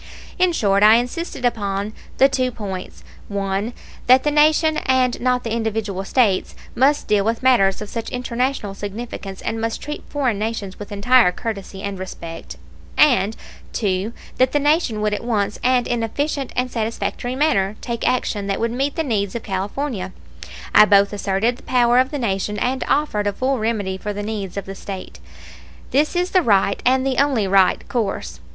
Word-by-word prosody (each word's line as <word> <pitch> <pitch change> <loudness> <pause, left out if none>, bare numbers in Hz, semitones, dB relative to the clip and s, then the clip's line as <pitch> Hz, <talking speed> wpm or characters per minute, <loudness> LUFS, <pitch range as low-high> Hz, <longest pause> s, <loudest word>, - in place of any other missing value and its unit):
In 365 -1 +4
short, 200 -10 +2
I 215 +1 +8
insisted 250 +3 -2
upon 205 -3 -1 0.2
the 270 - +7
two 260 -2 0
points 195 -5 -7 0.2
(1) 200 +2 -2 0.4
that 255 +1 +6
the 295 - +1
Nation 310 +1 +4
and 255 -1 +2
not 250 0 +1
the 230 - -3
individual 220 -4 -2
States 210 -5 +1 0.2
must 280 +4 +2
deal 205 -1 +3
with 225 +4 -1
matters 210 -7 +3
of - - -8
such 230 -1 -4
international 250 -3 -2
significance 200 -1 -7
and 225 0 -2
must 225 0 -2
treat 295 +1 -6
foreign 255 -8 0
nations 215 -3 -4
with 205 - -8
entire 225 +1 +4
courtesy 195 -1 -6
and 200 -2 -4
respect; 170 -3 -8 0.4
and 225 -8 +4 0.4
(2) 195 0 -1 0.3
that 255 0 +3
the 290 - +3
Nation 290 -7 +1
would 210 0 +1
at 210 - -3
once, 210 -3 -1
and 250 -1 +3
in 240 -1 -1
efficient 280 +4 -2
and 250 0 -1
satisfactory 230 +2 -3
manner, 215 -9 +1
take 235 -2 -3
action 215 -5 -1
that 195 - -1
would 230 0 0
meet 275 +4 -1
the 325 - 0
needs 205 -7 -1
of 235 - -4
California. 195 0 -3 0.6
I 210 - +8
both 200 -1 +4
asserted 205 +4 0
the - - -16
power 245 -1 +3
of 260 +1 +3
the 290 - -4
Nation 210 -4 -1
and 255 +5 -1
offered 275 -8 +1
a 205 - 0
full 260 +4 0
remedy 205 -4 -1
for 210 +1 -4
the 205 +1 -4
needs 205 -3 -4
of 200 - -3
the 195 - -6
State. 195 -1 -8 0.7
This 300 +5 +2
is 355 +1 0
the 370 - +4
right, 200 - +2
and 260 +1 +3
the 265 -2 0
only 270 -8 +2
right, 190 -1 +3
course. 220 -6 -3
225 Hz, 180 wpm, -21 LUFS, 200-255 Hz, 0.7 s, I